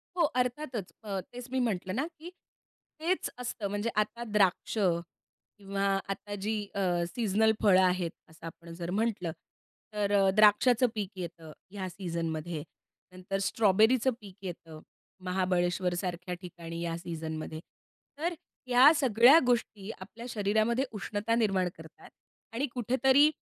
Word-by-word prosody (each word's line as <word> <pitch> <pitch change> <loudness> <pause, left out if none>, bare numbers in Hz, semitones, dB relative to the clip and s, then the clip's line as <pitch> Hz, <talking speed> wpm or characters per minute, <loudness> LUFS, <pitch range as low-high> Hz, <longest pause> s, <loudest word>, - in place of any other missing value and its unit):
हो, 345 - +3 0.2
अर्थातच 250 -5 -4
अ, 200 -2 -3
तेच 245 +6 -10
मी 260 - 0
म्हटलं 185 -1 -3
ना, 275 +5 0
की 340 +2 -8 0.7
हेच 360 +3 0
असतं, 230 -4 -3
म्हणजे 205 +3 -1
आता 235 +3 -9
द्राक्ष 195 +3 +2
किंवा 195 +2 -3 0.3
आता 205 +1 -8
जी 220 0 0 0.2
अ, 200 - -1 0.4
सीजनल 220 -1 +3
फळं 190 -3 +6
आहेत 180 -2 +1 0.2
असं 160 +1 -14
आपण 165 +1 -10
जर 170 0 -4
म्हटलं. 205 -7 -1 0.6
तर 205 -1 0 0.2
द्राक्षाचं 220 +4 +5
पीक 200 -3 -2
येतं 165 -3 -7 0.2
या 190 -2 -4
सीझनमध्ये, 165 -3 -4 0.5
नंतर 185 +2 -4
स्ट्रॉबेरीचं 220 +5 +3
पीक 195 -3 -12
येतं 165 -3 -7 0.5
महाबळेश्वरसारख्या 180 -1 -1
ठिकाणी 170 -2 -7
या 165 -1 -2
सीझनमध्ये. 160 -2 -5 0.6
तर 340 +3 -1 0.3
ह्या 255 +4 +8
सगळ्या 255 +1 +6
गोष्टी 220 -4 0
आपल्या 220 +5 -10
शरीरामध्ये 220 +4 +1
उष्णता 205 +2 -1
निर्माण 195 -6 +2
करतात 160 -1 -14 0.4
आणि 260 +5 0
कुठेतरी 265 +4 +4
200 Hz, 125 wpm, -30 LUFS, 175-235 Hz, 0.7 s, ह्या